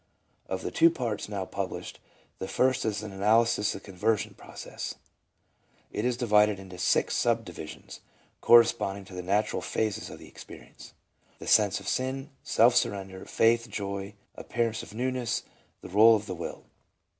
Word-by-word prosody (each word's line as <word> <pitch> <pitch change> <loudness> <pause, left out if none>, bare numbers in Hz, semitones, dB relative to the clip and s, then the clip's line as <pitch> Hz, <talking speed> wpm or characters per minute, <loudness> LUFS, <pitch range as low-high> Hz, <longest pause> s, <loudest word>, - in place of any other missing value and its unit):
Of 95 0 -3
the - - -3
two 165 +1 +6
parts 120 -11 -3
now 100 -3 -3
published, 95 -1 -5 0.4
the 95 - -4
first 130 +4 +1
is 105 -1 -1
an 105 - -6
analysis 105 +2 +2
of - - -8
the - - -15
conversion 100 +3 -1
process; - - -8 1.0
it 105 - -2
is 125 -1 0
divided 105 -4 +3
into 95 -2 -11
six - - +2
subdivisions, 110 -10 -3 0.4
corre 120 0 +8
sponding 100 -4 -3
to 95 - -13
the 90 - -4
natural 100 +4 0
phases 110 -1 -2
of - - -9
the - - -13
experience: - - -13 0.4
The - - -10
Sense 105 -2 +4
of - - -11
Sin, 135 +3 -2
Self 120 +2 +4
surrender, 95 -2 -1
Faith, 115 +1 +2
Joy, 100 -1 -5 0.2
Appearance 115 -2 -2
of 105 - -11
Newness, 125 0 -1 0.4
The - - -9
Bole 110 +4 +7
of 105 0 -3
the 95 - -5
Will. 85 -1 -7
105 Hz, 160 wpm, -28 LUFS, 95-115 Hz, 1.0 s, corre